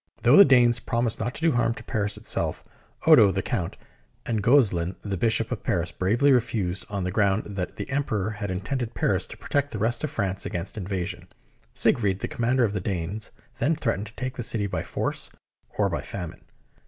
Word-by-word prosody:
Though 125 Hz, +4 st, +6 dB
the 200 Hz, -, +11 dB
Danes 120 Hz, -3 st, +5 dB
promised 115 Hz, -2 st, -1 dB
to 115 Hz, +2 st, -1 dB
do 160 Hz, +5 st, +1 dB
no 120 Hz, -, 0 dB
harm 115 Hz, -1 st, +1 dB
to -, -, -10 dB
Paris 105 Hz, -4 st, -2 dB
itself, -, -, -1 dB, 0.4 s
Odo, 100 Hz, -, +8 dB
the 95 Hz, 0 st, -2 dB
Count, 90 Hz, -9 st, -3 dB, 0.5 s
and 110 Hz, -3 st, -1 dB
Gozelin, 100 Hz, -8 st, +3 dB
the 100 Hz, -2 st, -3 dB
Bishop, 115 Hz, +3 st, +1 dB
of 125 Hz, -, -3 dB
Paris, 85 Hz, -1 st, -1 dB
bravely 115 Hz, +12 st, +2 dB
refused 105 Hz, -7 st, 0 dB
on 100 Hz, -2 st, -3 dB
the 90 Hz, -, -2 dB
ground 100 Hz, +1 st, +2 dB
that 95 Hz, -3 st, -5 dB
the -, -, -5 dB
Emperor 110 Hz, -8 st, -1 dB
had 105 Hz, -2 st, -5 dB
intended 115 Hz, +6 st, -3 dB
Paris -, -, +1 dB
to -, -, -11 dB
protect 145 Hz, 0 st, -1 dB
the 110 Hz, -, -5 dB
rest 115 Hz, +5 st, 0 dB
of 155 Hz, -, -1 dB
France 100 Hz, -8 st, -2 dB
against 85 Hz, +2 st, -4 dB
invasion. 95 Hz, -3 st, -4 dB, 0.5 s
Siegfried, 100 Hz, -5 st, +2 dB
the -, -, -4 dB
commander 120 Hz, +2 st, +1 dB
of 105 Hz, -3 st, +1 dB
the 100 Hz, -, -2 dB
Danes, 95 Hz, +3 st, -3 dB, 0.3 s
then 150 Hz, +7 st, +2 dB
threatened 115 Hz, -8 st, -2 dB
to 110 Hz, -, -12 dB
take 130 Hz, 0 st, -4 dB
the -, -, -3 dB
city 110 Hz, -2 st, +1 dB
by 95 Hz, -2 st, -2 dB
force -, -, -3 dB, 0.5 s
or -, -, +3 dB
by -, -, -2 dB
famine. 90 Hz, -4 st, -7 dB
110 Hz, 200 wpm, -25 LUFS, 95-120 Hz, 0.5 s, the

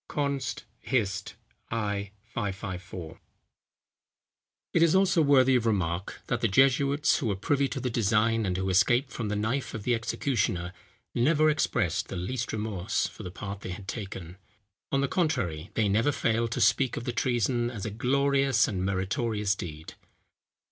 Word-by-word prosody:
Const. 140 Hz, -3 st, -2 dB, 0.2 s
Hist. 105 Hz, -6 st, -1 dB, 0.3 s
i. 105 Hz, -3 st, -2 dB, 0.2 s
554.] 95 Hz, -5 st, -5 dB, 1.5 s
It 165 Hz, -, +3 dB
is 170 Hz, +1 st, +5 dB
also 190 Hz, -3 st, +4 dB
worthy 135 Hz, -3 st, +5 dB
of 115 Hz, -2 st, +2 dB
remark, 95 Hz, -3 st, -1 dB
that -, -, -1 dB
the -, -, +3 dB
jesuits 135 Hz, +5 st, +3 dB
who 135 Hz, -, -2 dB
were 100 Hz, -, 0 dB
privy 140 Hz, +8 st, +1 dB
to -, -, -4 dB
the 125 Hz, -, -2 dB
design, 115 Hz, +1 st, +2 dB
and 95 Hz, -3 st, -1 dB
who 95 Hz, 0 st, -1 dB
escaped 120 Hz, +8 st, +3 dB
from 115 Hz, -, -4 dB
the 105 Hz, -, -1 dB
knife 115 Hz, +6 st, -1 dB
of 110 Hz, -, -5 dB
the 125 Hz, -, +1 dB
executioner, 115 Hz, -6 st, -1 dB, 0.4 s
never 155 Hz, +5 st, +4 dB
expressed 110 Hz, -, 0 dB
the -, -, -6 dB
least 115 Hz, +8 st, -3 dB
remorse 105 Hz, -2 st, -1 dB
for -, -, -7 dB
the 90 Hz, -, -6 dB
part 100 Hz, +2 st, -7 dB
they -, -, -6 dB
had 95 Hz, +2 st, -7 dB
taken; 95 Hz, -5 st, -6 dB, 0.5 s
on 135 Hz, -, +2 dB
the 140 Hz, -, +1 dB
contrary, 90 Hz, -, -1 dB
they 110 Hz, -2 st, +2 dB
never 110 Hz, +8 st, +2 dB
failed 115 Hz, -3 st, 0 dB
to -, -, -2 dB
speak 130 Hz, -3 st, +3 dB
of -, -, -4 dB
the 120 Hz, -, -3 dB
treason 120 Hz, 0 st, +1 dB
as 110 Hz, -5 st, -6 dB
a 110 Hz, -, -3 dB
glorious 135 Hz, +2 st, +2 dB
and 95 Hz, -3 st, -2 dB
meritorious 100 Hz, +2 st, 0 dB
deed. 80 Hz, -5 st, -7 dB
115 Hz, 160 wpm, -28 LUFS, 95-130 Hz, 1.5 s, is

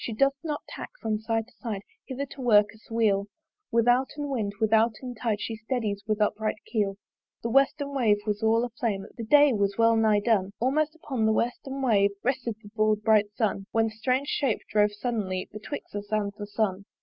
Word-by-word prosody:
She 230 Hz, -, -3 dB
doth 275 Hz, +5 st, +3 dB
not 300 Hz, -3 st, -3 dB
tack -, -, -7 dB
from 215 Hz, -1 st, -1 dB
side 225 Hz, 0 st, -1 dB
to 250 Hz, -, -23 dB
side 210 Hz, -5 st, -4 dB, 0.2 s
Hither 270 Hz, +1 st, -3 dB
to 275 Hz, -, -9 dB
work 210 Hz, -4 st, +4 dB
us 220 Hz, -, -20 dB
weal 210 Hz, -3 st, +2 dB, 0.4 s
Withouten 250 Hz, +5 st, +2 dB
wind, 215 Hz, -6 st, -1 dB
withouten 225 Hz, +3 st, +2 dB
tide 220 Hz, -2 st, -1 dB
She 225 Hz, -, -4 dB
steddies 220 Hz, -2 st, -2 dB
with 215 Hz, -1 st, 0 dB
upright 215 Hz, +1 st, 0 dB
keel. 200 Hz, -4 st, -1 dB, 0.5 s
The 230 Hz, -, -2 dB
western 280 Hz, +2 st, +2 dB
wave 230 Hz, -6 st, +3 dB
was 210 Hz, 0 st, -1 dB
all 225 Hz, +2 st, +3 dB
a -, -, -6 dB
flame, 215 Hz, -4 st, -2 dB
The 230 Hz, -, -6 dB
day 290 Hz, +4 st, +6 dB
was 200 Hz, -2 st, 0 dB
well 230 Hz, 0 st, +5 dB
nigh 215 Hz, -2 st, +3 dB
done! 200 Hz, -3 st, +1 dB
Almost 300 Hz, +6 st, +1 dB
upon 260 Hz, -8 st, -1 dB
the -, -, +4 dB
western 265 Hz, +4 st, -2 dB
wave 205 Hz, -5 st, +4 dB
Rested 245 Hz, -3 st, -1 dB
the 205 Hz, -, -11 dB
broad 215 Hz, -1 st, +1 dB
bright 210 Hz, -2 st, +4 dB
Sun; 200 Hz, -3 st, -1 dB
When 225 Hz, 0 st, +2 dB
that -, -, -13 dB
strange 255 Hz, +5 st, 0 dB
shape 265 Hz, -7 st, 0 dB
drove 210 Hz, 0 st, +3 dB
suddenly 205 Hz, -4 st, -3 dB
Betwixt 215 Hz, +4 st, -7 dB
us 205 Hz, 0 st, -6 dB
and 205 Hz, -2 st, 0 dB
the 205 Hz, -1 st, -7 dB
Sun. 200 Hz, -2 st, -1 dB
220 Hz, 195 wpm, -27 LUFS, 210-245 Hz, 0.5 s, day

